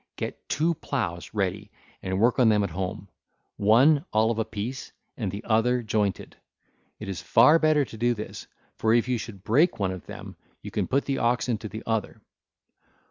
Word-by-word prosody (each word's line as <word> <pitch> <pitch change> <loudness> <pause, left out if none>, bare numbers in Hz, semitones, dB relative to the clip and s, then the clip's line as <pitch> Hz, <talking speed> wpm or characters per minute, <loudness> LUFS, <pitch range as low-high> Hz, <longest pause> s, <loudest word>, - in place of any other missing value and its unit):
Get - - -6
two 165 +3 +1
ploughs 100 - -4
ready 100 +1 -2 0.3
work 100 +8 +1
on 120 -3 +6
them 105 -1 +3
at 100 - -3
home, 95 +3 -4 0.5
one 130 +9 +5
all 110 +1 +3
of 115 - -2
a 110 - 0
piece, 110 +4 -6 0.2
and 105 -6 -3
the 100 +4 -6
other 120 +2 +2
jointed. 105 -4 -2 0.6
It 105 - -8
is 95 -3 -4
far 160 +2 +5
better 155 -2 +3
to 115 - -11
do 120 +1 +2
this, 105 - -8 0.3
for 110 +1 +2
if 120 +1 +2
you 125 -2 0
should 100 -4 -9
break 145 +12 +3
one 100 -3 0
of 95 -1 -8
them, - - -9 0.3
you - - -7
can - - -1
put 140 +2 +1
the 135 - -1
oxen 120 -1 0
to 110 0 -7
the 110 +2 -7
other. 110 -2 -2
110 Hz, 190 wpm, -26 LUFS, 100-125 Hz, 0.6 s, on